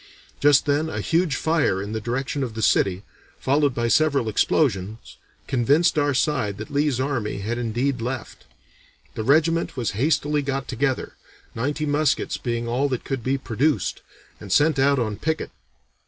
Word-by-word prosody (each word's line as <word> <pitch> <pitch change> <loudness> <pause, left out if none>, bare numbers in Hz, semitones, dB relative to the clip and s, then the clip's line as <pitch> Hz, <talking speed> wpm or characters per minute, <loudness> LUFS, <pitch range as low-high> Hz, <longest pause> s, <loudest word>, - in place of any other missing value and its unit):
Just 145 0 +5
then 150 +2 +1
a - - -4
huge 165 -4 +1
fire 160 - +1
in 100 +2 -5
the 110 0 -3
direction 130 +5 -2
of 120 -4 -3
the 110 - -3
city, 95 0 +2 0.3
followed 140 -1 +1
by 120 0 0
several 140 -3 +2
explosions, 110 - 0 0.3
convinced 140 +7 +2
our 145 -2 +1
side 125 -8 0
that 110 - -8
Lee's 145 -2 +1
army 120 -7 -2
had 115 +4 -3
indeed 120 +2 -1
left. 125 0 -5 0.7
The - - -4
regiment 160 +5 +2
was 120 -3 -1
hastily 145 +5 +1
got 135 -1 -3
together, 130 +1 -1 0.4
ninety 145 +6 -2
muskets 145 0 0
being 120 -1 -3
all 130 +4 0
that 130 -3 -3
could 135 -4 -3
be 135 +3 0
produced, 135 +4 -1 0.4
and 100 -3 -9
sent 150 - +3
out 140 +1 +4
on 110 -4 -1
picket. 160 0 -2
135 Hz, 160 wpm, -23 LUFS, 115-145 Hz, 0.7 s, Just